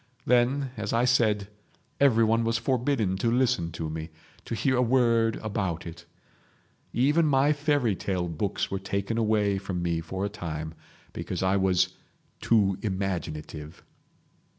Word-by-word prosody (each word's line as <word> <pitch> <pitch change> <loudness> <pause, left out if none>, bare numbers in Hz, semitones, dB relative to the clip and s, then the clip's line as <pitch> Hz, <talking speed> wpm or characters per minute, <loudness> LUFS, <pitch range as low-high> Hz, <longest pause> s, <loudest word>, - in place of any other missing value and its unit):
Then, 125 +2 +2
as 105 -1 -3
I 115 +2 +3
said, 110 -5 +2 0.5
everyone 115 -4 +4
was 115 0 +1
forbidden 120 -5 0
to 115 - +1
listen 120 -9 +1
to 80 -2 -4
me, 80 +1 -5 0.4
to - - -3
hear 130 +5 +1
a 125 - +3
word 115 -2 +3
about 95 -6 -2
it. 85 0 -9 0.9
Even 150 +6 +3
my 140 +1 +4
fairy 145 -7 +1
tale 90 -1 -2
books 85 +4 -2
were 95 - -1
taken 100 +3 -2
away 105 -3 +2
from 95 -3 -4
me 85 -1 0
for 95 +4 -4
a - - +1
time—because 80 -1 -6
I 95 +1 +2
was 95 -2 +2 0.5
'too 100 -5 +2
imaginative. 85 -6 -4
105 Hz, 140 wpm, -27 LUFS, 90-120 Hz, 0.9 s, everyone